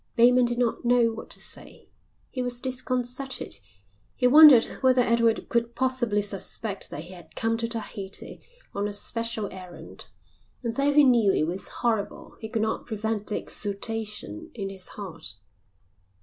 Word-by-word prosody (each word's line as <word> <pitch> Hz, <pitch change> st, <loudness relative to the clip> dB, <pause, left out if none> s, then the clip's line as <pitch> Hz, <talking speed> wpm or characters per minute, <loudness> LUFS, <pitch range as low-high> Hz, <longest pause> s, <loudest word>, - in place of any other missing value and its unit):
Bateman 245 Hz, +1 st, +6 dB
did 240 Hz, 0 st, -2 dB
not 240 Hz, -2 st, 0 dB
know 240 Hz, -1 st, +4 dB
what 225 Hz, -, -9 dB
to -, -, -5 dB
say. -, -, -3 dB, 0.4 s
He 255 Hz, -, -3 dB
was 245 Hz, -1 st, -1 dB
disconcerted. 255 Hz, -, -2 dB, 0.6 s
He 250 Hz, -, 0 dB
wondered 280 Hz, -2 st, +9 dB, 0.2 s
whether 255 Hz, -1 st, +4 dB
Edward 230 Hz, -1 st, +2 dB
could 235 Hz, 0 st, -1 dB
possibly 240 Hz, -5 st, +1 dB
suspect 200 Hz, +1 st, -3 dB
that 145 Hz, -, -6 dB
he 175 Hz, +2 st, -11 dB
had 175 Hz, -2 st, -13 dB
come 225 Hz, 0 st, 0 dB
to 230 Hz, 0 st, -1 dB
Tahiti 210 Hz, -4 st, -4 dB, 0.3 s
on 200 Hz, +1 st, -1 dB
a 205 Hz, -, -5 dB
special 225 Hz, +1 st, -3 dB
errand. 185 Hz, -2 st, -11 dB, 0.6 s
And 230 Hz, -1 st, -2 dB
though 280 Hz, +1 st, +2 dB
he 295 Hz, +1 st, +6 dB
knew 235 Hz, -7 st, +5 dB
it 155 Hz, -, +1 dB
was 180 Hz, +4 st, -5 dB
horrible 225 Hz, -4 st, -2 dB
he 220 Hz, -, -7 dB
could 220 Hz, 0 st, -1 dB
not 220 Hz, -, -2 dB
prevent 220 Hz, -1 st, -3 dB
the 210 Hz, -, +2 dB
exultation 220 Hz, +9 st, -3 dB
in 195 Hz, -4 st, -4 dB
his 190 Hz, -1 st, -4 dB
heart. 180 Hz, -, -7 dB
230 Hz, 160 wpm, -26 LUFS, 205-245 Hz, 0.6 s, wondered